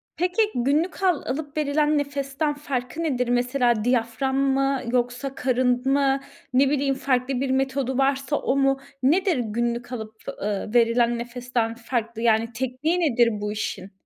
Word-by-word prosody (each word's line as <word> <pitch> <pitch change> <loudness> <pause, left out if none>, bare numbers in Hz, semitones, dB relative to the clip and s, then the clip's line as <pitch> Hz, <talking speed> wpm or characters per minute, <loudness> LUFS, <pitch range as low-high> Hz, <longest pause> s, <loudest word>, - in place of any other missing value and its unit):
Peki 390 +5 +1
günlük 300 +10 0
al 360 -6 +3
alıp 285 +2 -4
verilen 300 0 +2
nefesten 285 +1 -1
farkı 285 +1 -4
nedir? 250 -6 0
Mesela 245 -2 +1
diyafram 245 +2 0
mı 275 0 +1
yoksa 250 +2 -1
karın 250 0 +1
mı 275 -1 +2 0.3
ne 265 +2 +4
bileyim 275 -1 +1
farklı 255 -1 0
bir 275 - -1
metodu 265 -1 0
varsa 275 +1 +1
o 265 - 0
mu? 270 0 +2 0.2
Nedir 345 +3 +3
günlük 235 +2 -2
alıp, 220 -2 -6 0.3
eee, 210 +2 -3
verilen 235 0 +3
nefesten 240 -1 -2
farklı? 230 -1 -3
Yani 230 0 +2
tekniği 260 +8 -1
nedir 245 -8 +3
bu 210 - -2
işin? 200 -2 -4
260 Hz, 145 wpm, -24 LUFS, 240-280 Hz, 0.3 s, ne